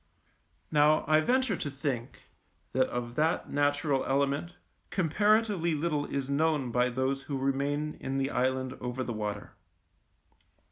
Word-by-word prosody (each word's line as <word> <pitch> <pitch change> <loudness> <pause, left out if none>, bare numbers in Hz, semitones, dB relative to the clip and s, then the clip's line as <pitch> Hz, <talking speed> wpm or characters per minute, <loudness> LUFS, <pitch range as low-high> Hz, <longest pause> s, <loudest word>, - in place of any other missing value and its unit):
Now 150 +1 +4
I 155 +1 +5
venture 250 +5 +2
to 150 - -3
think 135 -4 -4 0.5
that 130 0 +3
of 120 -1 -4
that 160 +3 +1
natural 145 -1 +1
element 140 +5 0 0.4
comparatively 200 0 +2
little 150 -1 -1
is 140 -1 -3
known 145 -2 +1
by 125 +1 +2
those 130 +2 -1
who 140 0 -4
remain 140 +3 -1
in 135 +1 -3
the 135 +1 0
island 130 0 0
over 125 +1 -3
the 120 - -4
water. 105 -1 -4
140 Hz, 135 wpm, -29 LUFS, 130-155 Hz, 0.5 s, I